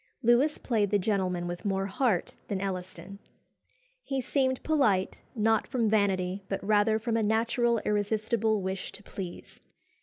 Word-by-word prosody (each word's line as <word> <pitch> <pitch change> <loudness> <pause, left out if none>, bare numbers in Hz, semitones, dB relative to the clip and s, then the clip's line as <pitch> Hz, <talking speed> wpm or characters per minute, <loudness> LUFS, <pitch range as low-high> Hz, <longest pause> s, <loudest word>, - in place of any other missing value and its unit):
Lewis 245 +6 +4
played 215 -5 0
the 205 - +3
gentleman 185 -3 0
with 175 0 -5
more 195 -2 0
heart 200 -1 0
than 195 - -2
Elliston. 190 +1 -5 0.8
He 270 - -3
seemed 260 0 0
polite, 220 -12 +1
not 220 0 +2
from 230 -5 0
vanity, 195 -2 +1
but 195 - -3
rather 215 +1 +3
from 225 +1 -2
a 230 - +2
natural 230 +2 +2
irresistible 215 0 0
wish 190 0 -4
to 205 - -11
please. 185 -4 -8
210 Hz, 145 wpm, -29 LUFS, 195-230 Hz, 0.8 s, Lewis